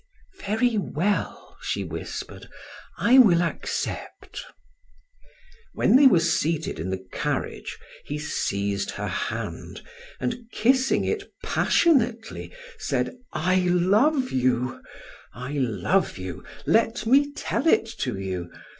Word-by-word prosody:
"Very 220 +2 +1
well," 195 +2 -2
she - - -2
whispered, - - -7 0.5
"I 255 +3 +5
will 175 -8 +6
accept." 170 - -4 1.3
When - - +4
they 275 +1 +8
were 185 -10 +5
seated 165 - 0
in 85 +4 -3
the 95 0 -4
carriage, - - -3 0.3
he 145 - -4
seized 100 -9 -2
her - - -4
hand, - - -4 0.4
and 230 - -4
kissing 260 +4 +2
it 415 -2 -3
passionately 240 -9 +1 0.3
said: - - -1 0.2
"I 180 +3 +1
love 200 - +3
you, 125 0 0 0.5
I 125 +4 -6
love 125 - 0
you. 95 -2 -7 0.2
Let 225 0 +2
me 280 +5 +4
tell 280 -1 -2
it 275 - +4
to 125 -6 -2
you. 95 -3 -4
180 Hz, 110 wpm, -25 LUFS, -, 1.3 s, they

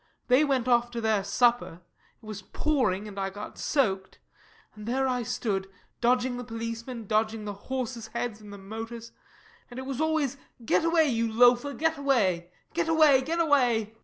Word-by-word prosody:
They 255 +4 +6
went 265 -4 +1
off 240 -1 +3
to 240 -1 -5
their 220 -3 +1
supper 235 -3 +1 0.4
it - - -14
was 215 -2 -7
pouring, 230 -6 0
and 200 -1 -7
I 195 0 -1
got 205 +2 -9
soaked 195 -10 0 0.6
and 210 0 -10
there 265 +2 +1
I 250 -1 0
stood, 215 -5 -2 0.3
dodging 245 +1 +2
the 245 - -5
policemen, 230 0 -6
dodging 215 +1 0
the 205 - -4
horses' 235 +2 -5
heads 230 -1 -4
and 210 -1 -11
the 200 - -8
motors 225 +4 -7 0.6
and 245 - -10
it 260 - -5
was 270 +1 -3
always 315 -4 0 0.3
get - - +2
away, 330 -1 +3
you 230 -3 0
loafer, 245 +4 +4
get 320 -1 0
away 195 -11 +1 0.2
get 335 0 0
away 305 -5 +6
get 325 +6 -2
away 275 -8 +3
MARY. - - -31
240 Hz, 180 wpm, -27 LUFS, 215-265 Hz, 0.6 s, They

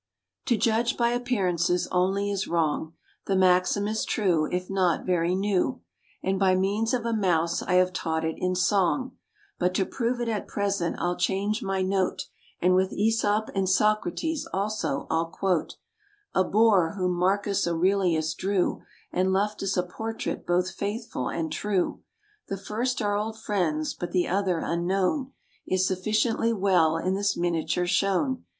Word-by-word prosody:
To 240 - +3
judge 230 +3 +1
by 235 -1 +3
appearances 185 -8 0
only 195 +3 +1
is 200 0 -2
wrong, 160 -1 0 0.3
The 195 - +1
maxim 185 +2 +3
is 220 +1 -1
true, 175 -7 +1
if 180 0 -2
not 185 -4 +1
very 175 -1 +1
new, 190 - 0 0.4
And 190 0 0
by 190 -2 +4
means 205 +5 0
of 245 -3 -1
a 230 - 0
mouse 170 -6 +1
I - - -2
have 185 0 +3
taught 160 -3 -2
it 160 - -1
in 185 0 0
song; 200 +7 +1 0.4
But 180 0 +1
to 190 - +2
prove 240 +3 -2
it 240 - -2
at 220 -3 -2
present 200 -4 -1
I'll 175 0 -1
change 200 +5 0
my 195 -1 -1
note, 190 0 0 0.4
And 180 +1 +3
with 185 +1 +1
Æsop 215 0 +1
and 195 -2 0
Socrates, 215 - +1
also, 200 -8 -2
I'll 165 +1 +1
quote 180 -1 -1 0.6
A 190 - +3
boor 200 -5 +3
whom 180 -1 0
Marcus 195 +2 +1
Aurelius 170 -2 +1
drew, 190 -1 0 0.3
And 185 +1 +1
left 205 +2 0
us 195 -1 -1
a 180 - +2
portrait 220 +5 -5
both 180 +1 +1
faithful 205 - -4
and 160 -2 -3
true. 195 +1 -1 0.5
The 195 - -3
first 225 +5 -2
are 205 0 +1
old 220 +2 -2
friends; 165 -8 -1
but 175 - -6
the 180 -2 +2
other, 185 -3 0
unknown, 190 - 0 0.3
Is 185 0 +2
sufficiently 215 +5 +1
well 185 -6 +3
in 185 +3 -1
this 200 +1 0
miniature 175 0 0
shown. 195 +9 0
190 Hz, 160 wpm, -26 LUFS, 180-210 Hz, 0.6 s, by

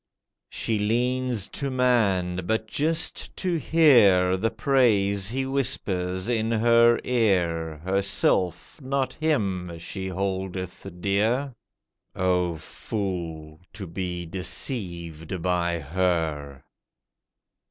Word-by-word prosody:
She 110 -2 -1
leans 120 0 0
to 140 - -3
man—but 110 -6 +1
just 155 +8 -1
to 185 -2 -1
hear 105 - +5
The 110 +4 0
praise 105 -6 +2
he 130 +3 -2
whispers 100 -9 0
in 115 -2 0
her 115 +1 +4
ear; 85 -9 0
Herself, 95 - +1
not 135 -1 -1
him, 95 - -1
she 95 +3 -5
holdeth 95 -1 -4
dear— 115 +8 +1 0.6
O 90 -2 +1
fool! 80 -4 -5
to 100 -2 -6
be 90 0 -4
deceived 85 - -4
by 85 -1 0
her. 80 -4 -2
95 Hz, 90 wpm, -25 LUFS, 90-120 Hz, 0.6 s, hear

